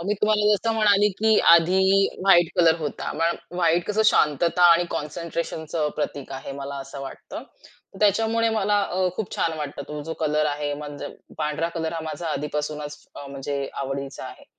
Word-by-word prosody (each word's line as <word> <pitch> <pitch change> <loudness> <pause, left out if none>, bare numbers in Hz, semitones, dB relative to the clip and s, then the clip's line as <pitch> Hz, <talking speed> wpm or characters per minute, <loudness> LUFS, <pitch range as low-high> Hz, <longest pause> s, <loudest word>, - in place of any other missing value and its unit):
अ, 170 - -6
मी 210 - +1
तुम्हाला 210 0 +2
जसं 225 +3 -1
म्हणाले 210 -1 +4
की 220 0 +4
आधी 170 +3 +5 0.4
व्हाईट 175 -3 +5
कलर 165 -2 +5
होता. 150 -3 -4
मग 170 +1 +2 0.2
व्हाईट 170 0 +2
कसं 210 +1 +1
शांतता 165 +4 +2
आणि 170 +1 +3
कॉन्सन्ट्रेशनचं 160 0 -3
प्रतीक 145 -2 -4
आहे, 135 +1 -6
मला 140 0 -6
असं 135 +1 -9
वाटतं. 135 - -8 0.6
त्याच्यामुळे 225 +2 +2
मला 205 -1 +1
अ, 185 -1 0
खूप 220 - -4
छान 165 - 0
वाटतं 145 -1 -5
तो 150 0 -5
जो 160 +2 -5
कलर 150 0 +1
आहे, 145 0 -2
म्हणजे 145 -1 -7 0.3
पांढरा 150 +2 -1
कलर 160 -1 -2
हा 165 - -4
माझा 165 +2 -5
आधीपासूनच 150 0 -4
अ, 140 - -8
म्हणजे 140 0 -4
आवडीचा 135 0 -5
आहे. - - -10
160 Hz, 170 wpm, -24 LUFS, 145-190 Hz, 0.6 s, आधी